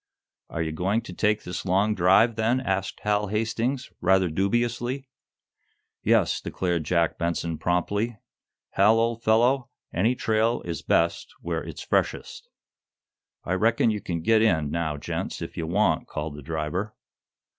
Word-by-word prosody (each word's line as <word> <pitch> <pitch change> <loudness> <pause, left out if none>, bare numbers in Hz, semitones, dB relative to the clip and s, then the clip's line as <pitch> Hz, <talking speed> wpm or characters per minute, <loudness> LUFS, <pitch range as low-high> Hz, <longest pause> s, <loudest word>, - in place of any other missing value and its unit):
"Are 80 - -2
you 80 - -3
going 95 +8 0
to 90 - -9
take 105 +3 +1
this 90 0 -5
long 100 +3 +2
drive, 105 +5 +4
then?" 115 +3 +1
asked 95 -6 -2
Hal 105 0 +1
Hastings, 115 +5 -2
rather 95 -1 +3
dubiously. 120 - -1 0.9
"Yes," - - +2
declared 85 -4 -2
Jack 85 -1 +1
Benson, 85 -1 -2
promptly. 100 +6 0 0.5
"Hal, 105 +3 +4
old 115 0 0
fellow, 120 +4 +3 0.2
any 110 +8 +2
trail 115 +1 +1
is 85 -1 -4
best - - +1
where - - -2
it's - - -8
freshest." - - -2 0.9
"I 90 - -2
reckon 115 +4 +3
you 105 -1 -3
can 85 -2 -4
git 110 +3 +4
in, 80 -10 +2
now, 80 -3 -1
gents, - - -4
if - - -7
ye - - -3
want," 85 -1 +1
called 75 0 -4
the 75 - -9
driver. 80 +7 -3
100 Hz, 145 wpm, -25 LUFS, 85-115 Hz, 0.9 s, drive